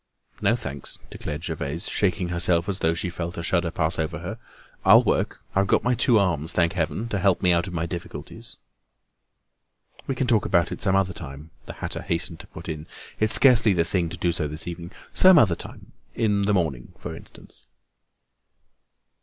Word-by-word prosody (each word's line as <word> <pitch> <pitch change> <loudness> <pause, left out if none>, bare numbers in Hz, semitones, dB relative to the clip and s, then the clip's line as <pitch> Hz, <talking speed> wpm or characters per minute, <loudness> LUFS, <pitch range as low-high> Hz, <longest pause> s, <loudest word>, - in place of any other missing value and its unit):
"No - - +3
thanks," 70 0 -6
declared 75 +2 -6
Gervaise, 80 +2 -2
shaking 90 -2 0
herself 85 0 +2
as 100 -2 -2
though 80 +1 +1
she 90 - -2
felt 85 0 -5
a 85 - -4
shudder 85 0 +1
pass 80 0 -1
over 80 -1 -2
her. 95 +8 -6 0.4
"I'll - - +7
work; - - -1
I've 95 0 +2
got - - +2
my 125 - +2
two 120 0 +4
arms, 85 -5 0
thank 85 -2 +2
heaven! 95 +6 -2
to 105 - -1
help 95 0 +2
me 90 - +5
out 85 +1 +1
of 90 - -7
my 85 -1 -1
difficulties." 85 0 -8 1.5
"We 135 - -1
can 130 - 0
talk 115 -4 +3
about 85 -2 +2
it - - -6
some 95 -2 +2
other 95 -1 +1
time," 70 +2 -9 0.2
the - - -6
hatter - - -5
hastened 85 0 -3
to - - -10
put - - -11
in. 80 -1 -5 0.3
"It's 110 0 +3
scarcely 120 -6 +5
the 85 -2 +1
thing 85 -1 0
to 85 - -7
do 85 - +1
so 80 -2 -2
this 75 +3 -5
evening. 85 0 -6 0.2
Some 185 -2 +7
other 110 - +5
time—in 105 +3 -3
the 105 - +2
morning 75 -9 -2
for - - -7
instance." - - -14
85 Hz, 190 wpm, -24 LUFS, 80-100 Hz, 1.5 s, I'll